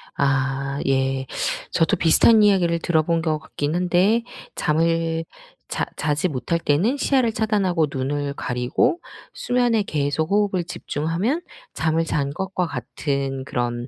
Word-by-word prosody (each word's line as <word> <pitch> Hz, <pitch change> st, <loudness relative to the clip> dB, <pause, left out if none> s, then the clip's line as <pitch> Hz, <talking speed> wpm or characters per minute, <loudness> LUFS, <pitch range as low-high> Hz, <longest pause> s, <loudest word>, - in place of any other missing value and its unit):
아 140 Hz, 0 st, 0 dB
예. 135 Hz, 0 st, +1 dB, 0.5 s
저도 170 Hz, +4 st, +2 dB
비슷한 210 Hz, +7 st, +6 dB
이야기를 180 Hz, -5 st, +3 dB
들어본 165 Hz, 0 st, +1 dB
것 155 Hz, -2 st, 0 dB
같긴 150 Hz, 0 st, -3 dB
한데 180 Hz, +6 st, +2 dB, 0.3 s
잠을 165 Hz, +1 st, 0 dB, 0.4 s
자 -, -, -2 dB
자지 155 Hz, +4 st, 0 dB
못할 155 Hz, +4 st, -2 dB
때는 170 Hz, -, +1 dB
시야를 260 Hz, -5 st, +2 dB
차단하고 200 Hz, -7 st, +1 dB
눈을 140 Hz, +2 st, -2 dB
가리고 125 Hz, -, 0 dB, 0.3 s
수면에 245 Hz, -3 st, +1 dB
계속 155 Hz, 0 st, -1 dB
호흡을 200 Hz, -3 st, +2 dB
집중하면 175 Hz, -, -2 dB, 0.3 s
잠을 165 Hz, 0 st, 0 dB
잔 140 Hz, -3 st, -1 dB
것과 185 Hz, +1 st, -2 dB
같은 135 Hz, 0 st, -3 dB
그런 120 Hz, -1 st, -3 dB
165 Hz, 265 characters per minute, -22 LUFS, 140-190 Hz, 0.5 s, 비슷한